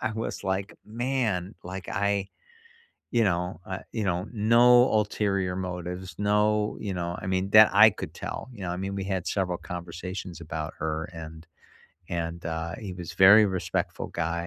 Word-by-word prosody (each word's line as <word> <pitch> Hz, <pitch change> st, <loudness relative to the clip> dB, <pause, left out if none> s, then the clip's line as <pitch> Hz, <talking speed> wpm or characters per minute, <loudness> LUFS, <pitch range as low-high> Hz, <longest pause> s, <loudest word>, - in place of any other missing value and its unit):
I 110 Hz, -, -1 dB
was 110 Hz, +1 st, -4 dB
like, 95 Hz, +1 st, -2 dB
"man," 110 Hz, -5 st, -1 dB
like, 95 Hz, 0 st, -7 dB
I 100 Hz, 0 st, 0 dB, 0.8 s
you 115 Hz, -2 st, +3 dB
know, 90 Hz, -2 st, -1 dB
I 95 Hz, 0 st, -5 dB
you 110 Hz, -, -2 dB
know 90 Hz, 0 st, -1 dB
no 120 Hz, +3 st, +5 dB
ulterior 100 Hz, -3 st, 0 dB
motives. 90 Hz, 0 st, -5 dB
No, 105 Hz, +1 st, +2 dB
you 100 Hz, -2 st, -3 dB
know, 85 Hz, 0 st, -3 dB
I -, -, -5 dB
mean, 95 Hz, +1 st, 0 dB
that 110 Hz, +1 st, +8 dB
I 105 Hz, +2 st, +9 dB
could -, -, -8 dB
tell, -, -, -6 dB
you 105 Hz, -5 st, -10 dB
know? 85 Hz, -, -3 dB
I 90 Hz, -, -2 dB
mean, 95 Hz, +1 st, -3 dB
we 95 Hz, -, -3 dB
had 95 Hz, -3 st, -2 dB
several 90 Hz, -3 st, -1 dB
conversations 90 Hz, 0 st, -7 dB
about 80 Hz, -1 st, -5 dB
her, 80 Hz, +1 st, -2 dB
and 80 Hz, 0 st, -9 dB, 0.6 s
and, 85 Hz, 0 st, -4 dB
uh, 80 Hz, 0 st, -3 dB
he 100 Hz, -4 st, -6 dB
was 90 Hz, -1 st, -7 dB
very 100 Hz, +3 st, +8 dB
respectful 95 Hz, -2 st, -2 dB
guy 85 Hz, +1 st, -2 dB
95 Hz, 170 wpm, -27 LUFS, 85-105 Hz, 0.8 s, I